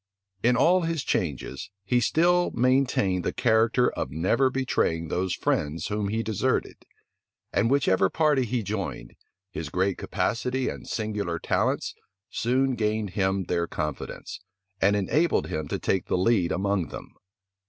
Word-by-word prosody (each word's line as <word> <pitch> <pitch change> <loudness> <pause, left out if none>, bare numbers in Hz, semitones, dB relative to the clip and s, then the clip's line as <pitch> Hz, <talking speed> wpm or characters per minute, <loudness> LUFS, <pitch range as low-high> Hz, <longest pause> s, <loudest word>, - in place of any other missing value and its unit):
In 120 +3 +3
all 175 +7 +4
his 165 -3 -1
changes, 70 -3 -2
he 120 +5 +2
still 175 +8 +3
maintained 125 -7 +2
the - - 0
character 115 +1 +3
of - - -4
never 95 - +2
betraying 85 -11 0
those 90 0 -1
friends 75 +1 -1
whom 105 -1 -1
he 110 +3 -1
deserted; 110 -4 -1 0.8
and 115 - +2
whichever 95 -9 +3
party 150 - +2
he 120 0 -1
joined, 100 - -4 0.4
his 80 -4 -5
great 95 +3 0
capacity 125 +3 -1
and - - -8
singular 105 -6 -2
talents - - 0 0.4
soon 130 +3 +1
gained 110 -3 -1
him 95 0 0
their 85 -1 -1
confidence, 75 -3 -5 0.4
and 100 +2 +4
enabled 145 - +1
him 80 -2 -3
to - - -2
take 95 - -1
the - - +1
lead 95 -2 +2
among 100 -2 0
them. - - -9
105 Hz, 145 wpm, -26 LUFS, 90-125 Hz, 0.8 s, all